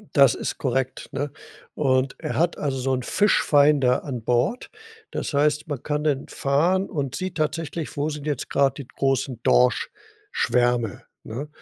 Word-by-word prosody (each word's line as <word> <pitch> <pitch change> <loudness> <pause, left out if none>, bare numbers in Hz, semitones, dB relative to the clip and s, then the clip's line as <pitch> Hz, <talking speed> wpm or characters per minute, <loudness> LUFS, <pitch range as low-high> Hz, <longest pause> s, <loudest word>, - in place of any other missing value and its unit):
Das 140 -5 +7
ist - - -4
korrekt, 130 0 -2
ne, 145 +1 -2 0.4
und 135 -2 +1
er 120 - -3
hat 170 +2 +1
also 140 -2 -2
so 130 +1 0
'n 130 -1 -1
Fischfinder 145 - +3
an 125 -5 -4
Bord. 125 - 0 0.4
Das - - -4
heißt, 150 +2 +2
man 145 -5 -5
kann 150 0 -2
dann 140 -3 0
fahren 170 +8 +1
und 140 -4 -3
sieht 185 -1 -4
tatsächlich, 155 0 -3
wo 145 +2 0
sind 150 -1 -6
jetzt 145 -4 -3
grad 140 -1 +2
die 140 -4 -8
großen 135 -3 -1
Dorschschwärme, 125 - +1 0.2
ne? 135 +7 -6
140 Hz, 155 wpm, -24 LUFS, 130-155 Hz, 0.4 s, Das